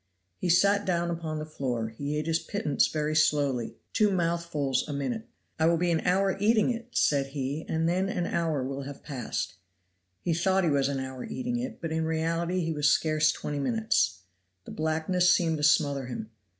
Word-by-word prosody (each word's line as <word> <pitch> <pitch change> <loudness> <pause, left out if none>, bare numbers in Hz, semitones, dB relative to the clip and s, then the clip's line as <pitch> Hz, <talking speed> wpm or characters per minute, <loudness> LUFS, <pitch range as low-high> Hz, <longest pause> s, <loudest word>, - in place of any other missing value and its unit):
He 180 - -1
sat 200 +4 +4
down 170 -2 0
upon 165 -2 -3
the 155 - -4
floor, 125 -7 -3
he 140 +6 -4
ate 150 - -2
his 165 0 +1
pittance 155 -9 0
very 155 0 -1
slowly, 140 -6 +2 0.2
two 215 -2 +4
mouthfuls 170 -6 0
a 145 - -4
minute. 220 - -3 0.3
"I 160 - +4
will 170 0 +3
be 175 +1 +1
an 165 - +2
hour 190 +2 +2
eating 215 +3 +3
it," 235 0 -5
said 140 -2 +3
he, 140 +2 -4
"and 160 0 +1
then 185 +3 +1
an 180 -3 -1
hour 160 -6 0
will 135 +1 -4
have 140 0 -8
passed." 135 -6 -4 0.7
He 170 - +1
thought 190 +3 +2
he 165 - +2
was 140 -1 +2
an 140 -1 -2
hour 130 -1 -5
eating 245 -1 -3
it, 255 +2 -5
but 165 -2 -4
in 160 0 0
reality 165 +3 0
he 165 -1 -1
was 150 -1 +3
scarce 155 -1 +3
twenty 145 -1 -4
minutes. 220 - +1 0.4
The - - -9
blackness 160 +3 +2
seemed 165 -2 +2
to 150 - -4
smother 145 -3 +3
him. 115 -3 -6
160 Hz, 195 wpm, -28 LUFS, 145-175 Hz, 0.7 s, sat